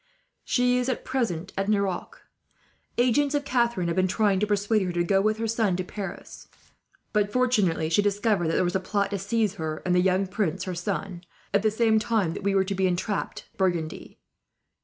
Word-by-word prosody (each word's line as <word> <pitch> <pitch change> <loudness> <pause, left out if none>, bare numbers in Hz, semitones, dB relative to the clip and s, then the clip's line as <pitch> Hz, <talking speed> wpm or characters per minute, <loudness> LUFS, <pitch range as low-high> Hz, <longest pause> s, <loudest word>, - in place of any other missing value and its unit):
She 250 0 +2
is 250 +1 -1
at 255 - -3
present 195 -9 -2
at 195 +1 -1
Nerac. 200 -3 -1 0.8
Agents 275 +4 +2
of 285 -1 -1
Catharine 235 -8 +1
have 170 - -1
been 185 0 +2
trying 200 0 +2
to 210 - +1
persuade 205 +1 +1
her 185 -2 -1
to 175 0 +1
go 195 +2 +2
with 215 +1 +1
her 225 0 -2
son 220 -4 +1
to 185 - -2
Paris; 195 +2 -8 0.7
but 205 -1 +1
fortunately, 205 -10 +2
she 165 +5 +3
discovered 205 -3 +1
that 165 - 0
there - - +2
was 175 0 -1
a - - +3
plot 200 +1 -1
to 200 - -2
seize 210 +1 0
her, 155 -1 -4
and 180 - +2
the 180 - +4
young 190 +1 +2
prince 185 -2 -2
her 185 - -4
son, 180 0 -4 0.3
at 200 - +4
the 215 - +3
same 220 0 +3
time 215 -6 0
that - - -6
we 200 0 0
were 195 - +4
to 200 - -2
be 190 0 +1
entrapped 185 +3 -2
in - - -34
Burgundy. 175 -5 -2
200 Hz, 210 wpm, -26 LUFS, 185-220 Hz, 0.8 s, the